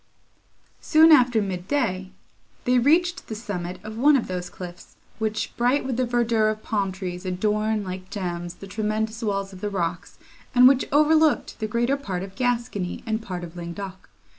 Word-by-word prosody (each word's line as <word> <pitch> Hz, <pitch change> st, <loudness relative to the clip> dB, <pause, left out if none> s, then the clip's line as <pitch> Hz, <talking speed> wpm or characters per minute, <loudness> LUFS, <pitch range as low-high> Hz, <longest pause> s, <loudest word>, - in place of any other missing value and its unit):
Soon 320 Hz, +1 st, +6 dB
after 245 Hz, -6 st, +5 dB
mid 185 Hz, -2 st, -4 dB
day, 190 Hz, -10 st, -1 dB, 0.6 s
they 250 Hz, -1 st, +4 dB
reached 345 Hz, +7 st, +2 dB
the 220 Hz, -, -5 dB
summit 185 Hz, -5 st, -5 dB
of 215 Hz, +1 st, -7 dB
one 290 Hz, +3 st, +6 dB
of 245 Hz, -, -2 dB
those 180 Hz, -1 st, -4 dB
cliffs, 180 Hz, -1 st, -10 dB, 0.2 s
which, 215 Hz, -1 st, -2 dB
bright 250 Hz, +4 st, +2 dB
with 260 Hz, -2 st, -2 dB
the 255 Hz, 0 st, 0 dB
verdure 235 Hz, -2 st, +2 dB
of 215 Hz, 0 st, -4 dB
palm 200 Hz, -3 st, -1 dB
trees, 180 Hz, -1 st, -6 dB
adorn, 210 Hz, +3 st, 0 dB
like 185 Hz, 0 st, -7 dB
gems, 175 Hz, -3 st, -4 dB
the -, -, -10 dB
tremendous 215 Hz, +2 st, -2 dB
walls 200 Hz, -3 st, -2 dB
of 185 Hz, -, -11 dB
the 210 Hz, -, -1 dB
rocks, 170 Hz, -3 st, -3 dB, 0.4 s
and 250 Hz, +1 st, +9 dB
which 265 Hz, 0 st, +4 dB
overlooked 305 Hz, 0 st, +3 dB
the 215 Hz, -, -2 dB
greater 240 Hz, +5 st, +1 dB
part 190 Hz, -10 st, -4 dB
of 195 Hz, -1 st, -8 dB
Gascony, 235 Hz, -5 st, -2 dB
and 220 Hz, -1 st, -1 dB
part 180 Hz, -5 st, -6 dB
of 170 Hz, 0 st, -9 dB
Languedoc. 185 Hz, +2 st, -7 dB
215 Hz, 175 wpm, -24 LUFS, 185-245 Hz, 0.6 s, and